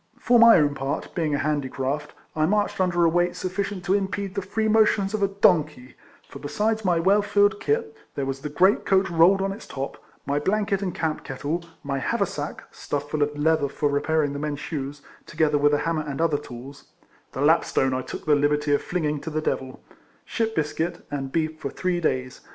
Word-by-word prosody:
For 240 -1 +3
my 230 0 +9
own 145 -3 +2
part, 135 +1 -4
being 155 -4 0
a - - 0
handicraft, 145 -1 -2 0.2
I 155 0 +2
marched 205 0 0
under 175 -2 +2
a - - +6
weight 175 +1 +1
suf 185 0 -5
ficient 200 -2 -3
to 190 - +1
impede 195 -1 -1
the 200 - -2
free 220 +4 -1
motions 215 -2 +3
of 215 - -1
a 200 - +4
donkey; 155 -10 +1 0.3
for - - -10
besides 215 +9 -1
my 180 -3 +2
well 195 +5 +4
filled 205 0 +2
kit, 445 0 -1 0.2
there 140 - -2
was 135 0 -3
the 150 - -5
great 185 +7 +3
coat 190 -1 +2
rolled 175 +4 +5
on 195 - -1
its 200 - -9
top, 135 0 -6 0.2
my 140 +1 0
blanket 200 +4 0
and 185 -3 -3
camp 160 -2 -2
kettle, 150 +5 -3 0.2
my 140 -1 -2
haversack, - - -2
stuffed 145 0 -5
full 155 - -1
of 145 0 0
leather 155 -1 +2
for 145 +1 -1
repairing 145 0 0
the 140 - -4
men's 150 -1 -3
shoes, 145 -2 -5 0.2
together 155 -2 +1
with 145 +1 +4
a 145 - +3
hammer 165 -1 0
and 145 -1 -5
other 160 -3 +2
tools 135 +1 -11 0.5
(the - - -4
lapstone 135 -1 +3
I 130 - -1
took - - -8
the 155 - +4
liberty 145 0 +2
of 145 - +2
flinging 150 -5 -2
to - - -5
the 155 0 -2
devil), 130 -4 -3 0.4
ship 225 -1 -2
biscuit 165 +3 -2
and 135 -2 -4
beef 155 0 -1
for 140 - -4
three 180 +4 -1
days. 130 -5 -2
160 Hz, 210 wpm, -24 LUFS, 145-195 Hz, 0.5 s, my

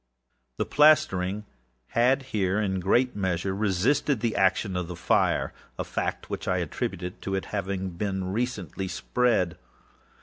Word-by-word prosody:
The - - 0
plastering 105 -10 +3 0.4
had 130 +4 +3
here, 100 -5 0
in 95 -3 0
great 120 +8 +2
measure, 95 -1 -1
resisted 110 +7 +1
the 115 -2 0
action 95 0 +2
of 90 -2 -2
the 90 - -6
fireâa 85 - +1 0.3
fact - - -3
which - - -5
I - - +2
attributed 90 +1 -4
to 95 - -2
its 95 - -3
having 95 -2 -2
been 95 +1 -2
recently 100 - -2
spread. 100 -6 +1
95 Hz, 135 wpm, -27 LUFS, 90-115 Hz, 0.4 s, plastering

